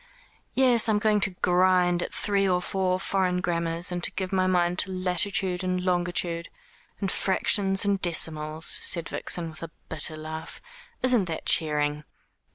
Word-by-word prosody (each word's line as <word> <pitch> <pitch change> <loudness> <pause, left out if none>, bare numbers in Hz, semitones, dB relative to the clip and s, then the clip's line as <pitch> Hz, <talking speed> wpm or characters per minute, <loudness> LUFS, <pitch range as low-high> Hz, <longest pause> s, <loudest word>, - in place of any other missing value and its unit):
"Yes, 245 -4 +4
I - - +3
am - - +2
going 210 0 +2
to 195 - +1
grind 180 -1 +3
at - - -4
three 200 -1 0
or 180 -1 +2
four 185 0 -1
foreign 185 -2 0
grammars, 170 0 -1
and 175 -1 -4
to - - +4
give 190 0 -5
my 185 -1 +2
mind 180 -1 +1
to 190 - +2
latitude 185 +1 -1
and 185 0 -1
longitude, 175 -2 -1 0.5
and 195 -3 -1
fractions, 195 0 +2
and 200 -1 0
decimals," 160 -2 -1
said 170 -2 +2
Vixen, 165 -2 -3
with 155 - -11
a 165 - -6 0.2
bitter 160 0 -1
laugh. 160 +1 -7 0.4
"Isn't 250 -6 +4
that 165 -2 -5
cheering?" 150 -1 +1
180 Hz, 165 wpm, -26 LUFS, 170-195 Hz, 0.5 s, Yes